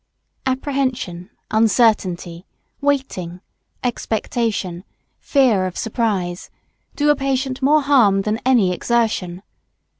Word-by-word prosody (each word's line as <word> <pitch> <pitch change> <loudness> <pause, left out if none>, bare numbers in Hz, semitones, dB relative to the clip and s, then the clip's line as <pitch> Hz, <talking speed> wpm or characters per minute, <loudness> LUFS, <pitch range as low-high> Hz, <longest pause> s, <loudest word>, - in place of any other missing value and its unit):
Apprehension, 260 -9 -2 0.2
uncertainty, 205 -6 +1 0.3
waiting, 265 -12 -1 0.4
expectation, 220 -6 -2 0.4
fear 235 -10 +2
of 180 - -7
surprise, 205 -7 -2 0.5
do 295 0 +3
a - - +3
patient 270 -1 -2
more 295 +2 +4
harm 225 -9 +4
than 215 +2 -1
any 240 -8 +3
exertion. 200 -4 -1
225 Hz, 90 wpm, -20 LUFS, 185-265 Hz, 0.5 s, more